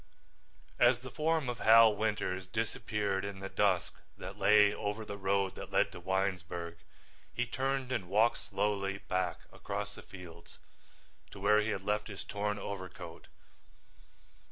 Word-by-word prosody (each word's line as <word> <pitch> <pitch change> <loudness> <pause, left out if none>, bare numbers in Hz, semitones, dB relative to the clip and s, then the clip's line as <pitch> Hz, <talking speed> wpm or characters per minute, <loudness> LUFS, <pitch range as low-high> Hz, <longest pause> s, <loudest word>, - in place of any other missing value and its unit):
As 120 0 +6
the 130 +1 -10
form 155 +1 +1
of 120 -2 -3
Hal 110 -1 +7
Winters 100 -3 -1
disappeared 105 -1 -1
in 100 -1 -5
the 95 0 -5
dusk 95 -4 +1 0.2
that - - -7
lay 105 -1 +5
over 105 +2 -3
the 100 - -5
road 100 -1 +1
that - - -8
led - - +3
to - - -9
Winesburg, 90 -2 -2 0.5
he 125 - -1
turned 130 +1 -1
and 110 -8 -2
walked 110 +4 +3
slowly 100 -1 -1
back 90 -3 -2
across - - -4
the - - -10
fields 90 -3 -12 0.7
to 100 - -11
where 105 +2 +5
he 105 - -1
had 95 -3 -2
left 105 +1 0
his 100 -3 -7
torn 105 0 -2
overcoat. 95 -4 -7
100 Hz, 150 wpm, -32 LUFS, 95-110 Hz, 0.7 s, Hal